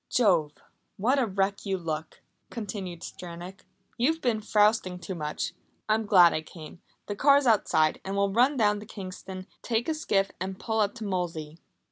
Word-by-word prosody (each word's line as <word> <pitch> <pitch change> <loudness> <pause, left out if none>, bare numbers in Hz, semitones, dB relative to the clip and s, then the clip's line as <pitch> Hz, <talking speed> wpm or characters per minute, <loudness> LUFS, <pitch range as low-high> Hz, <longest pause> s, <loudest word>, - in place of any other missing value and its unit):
"Jove! 175 -11 +3 0.4
What 255 +8 +2
a 250 - +2
wreck 195 0 -1
you 195 -1 -1
look!" 160 -2 -5 0.3
continued 195 -6 -6
Stranack. 175 +2 -9 0.3
"You've 315 +7 +2
been 240 -7 0
frousting 210 -3 +2
too 185 +1 -6
much. 155 0 -3 0.3
I'm 215 0 +1
glad 180 -4 +7
I 155 - -1
came. 160 +1 -12 0.2
The 205 - -4
car's 280 +4 +5
outside, 195 -9 +3
and 195 +1 -3
we'll 200 -1 +1
run 255 +6 +4
down 210 -3 +3
to 210 - -11
Kingston, 185 -2 -8 0.2
take 235 0 -1
a 320 - +1
skiff 195 -11 0
and 190 0 -4
pull 220 -1 -1
up 205 +1 +1
to 230 - -7
Molesey." 170 -5 -3
195 Hz, 170 wpm, -28 LUFS, 180-220 Hz, 0.4 s, glad